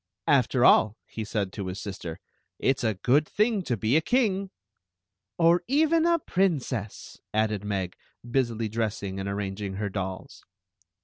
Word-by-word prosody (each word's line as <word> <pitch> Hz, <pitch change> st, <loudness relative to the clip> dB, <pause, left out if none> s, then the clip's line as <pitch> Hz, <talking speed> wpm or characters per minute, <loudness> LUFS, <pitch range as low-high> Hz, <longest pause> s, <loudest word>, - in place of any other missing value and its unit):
"After 130 Hz, -2 st, +3 dB
all," 110 Hz, 0 st, +5 dB
he 110 Hz, -, -6 dB
said 105 Hz, -3 st, -2 dB
to 100 Hz, -3 st, -5 dB
his 95 Hz, +2 st, -5 dB
sister, 95 Hz, -5 st, -6 dB, 0.4 s
"it 135 Hz, -, +1 dB
's -, -, -5 dB
a 110 Hz, -3 st, +1 dB
good 135 Hz, +10 st, +2 dB
thing 215 Hz, -1 st, +1 dB
to 125 Hz, -9 st, -2 dB
be 110 Hz, +6 st, +1 dB
a 160 Hz, -, +5 dB
king! 200 Hz, -3 st, +1 dB, 0.3 s
", 90 Hz, 0 st, -61 dB
" 100 Hz, +2 st, -60 dB
Or 170 Hz, +1 st, +4 dB
even 320 Hz, +5 st, +3 dB
a 340 Hz, 0 st, +4 dB
princess," 150 Hz, -, -2 dB, 0.2 s
added 110 Hz, -2 st, +1 dB
Meg, 95 Hz, -3 st, -2 dB, 0.3 s
busily 120 Hz, -3 st, 0 dB
dressing 105 Hz, -3 st, -3 dB
and 95 Hz, +1 st, -3 dB
arranging 100 Hz, 0 st, -4 dB
her 100 Hz, +1 st, -2 dB
dolls. 95 Hz, -1 st, -6 dB
110 Hz, 165 wpm, -27 LUFS, 100-155 Hz, 0.4 s, all